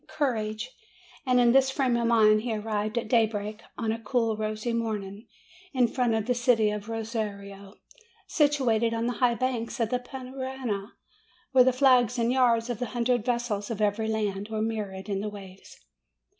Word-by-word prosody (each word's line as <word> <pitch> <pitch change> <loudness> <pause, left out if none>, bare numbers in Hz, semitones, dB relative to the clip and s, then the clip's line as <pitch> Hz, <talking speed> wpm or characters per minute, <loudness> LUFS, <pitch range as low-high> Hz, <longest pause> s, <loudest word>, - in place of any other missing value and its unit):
Courage!" 220 -4 -2 0.6
And 250 -1 +4
in 240 -1 +5
this 265 +1 +4
frame 265 -2 +1
of 235 0 +1
mind 215 -2 +5
he 230 -1 -2
arrived 215 +1 -2
at 235 - -1
daybreak, 215 -2 0 0.2
on 225 -2 -1
a 225 - -3
cool 225 -1 0
rosy 215 +2 -3
morning, 215 -2 -4 0.5
in 250 -2 +4
front 240 -1 0
of 220 -1 -1
the 250 - +1
city 240 -3 +2
of 210 +1 -6
Rosario, 205 -3 -5 0.5
situated 245 -7 +2
on 230 0 -1
the 245 - 0
high 240 -2 +4
bank 250 -1 -2
of 230 -2 +1
the 250 - +1
Parana, 255 -4 -5 0.6
where 260 -2 +7
the 260 - +4
flags 250 -2 +4
and 235 0 +1
yards 240 -3 +3
of 240 -2 -4
a 245 - -1
hundred 240 -1 +1
vessels 235 -4 -2
of 225 -3 -4
every 215 +1 0
land 210 -2 -2
were 220 -1 -3
mirrored 205 -4 -4
in 195 -1 -2
the 210 - -3
waves. 195 -2 -12
230 Hz, 175 wpm, -27 LUFS, 215-245 Hz, 0.6 s, where